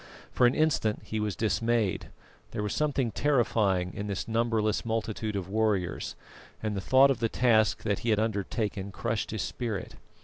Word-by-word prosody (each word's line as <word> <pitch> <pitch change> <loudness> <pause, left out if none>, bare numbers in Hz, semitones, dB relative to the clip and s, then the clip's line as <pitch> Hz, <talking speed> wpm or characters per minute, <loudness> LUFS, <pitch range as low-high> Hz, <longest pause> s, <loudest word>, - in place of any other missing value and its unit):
For 125 - +4
an 120 - +1
instant 140 -9 +1
he 110 - -3
was 105 -2 -1
dismayed; 115 -2 0 0.4
there 105 - -2
was 105 - -2
something 140 -6 0
terrifying 105 -11 +1
in 100 - -4
this 100 -2 -3
numberless 115 -2 +1
multitude 110 -1 -2
of 95 -3 -3
warriors, 105 -3 -1 0.5
and 105 -1 -1
the 100 - -2
thought 130 +6 +5
of 135 - -1
the 115 - +1
task 110 -4 +3
that 100 -3 0
he 120 - -2
had 110 - +3
undertaken 105 -2 -2
crushed 105 +1 -2
his 110 - -2
spirit. 110 -6 -4
110 Hz, 170 wpm, -28 LUFS, 100-115 Hz, 0.5 s, thought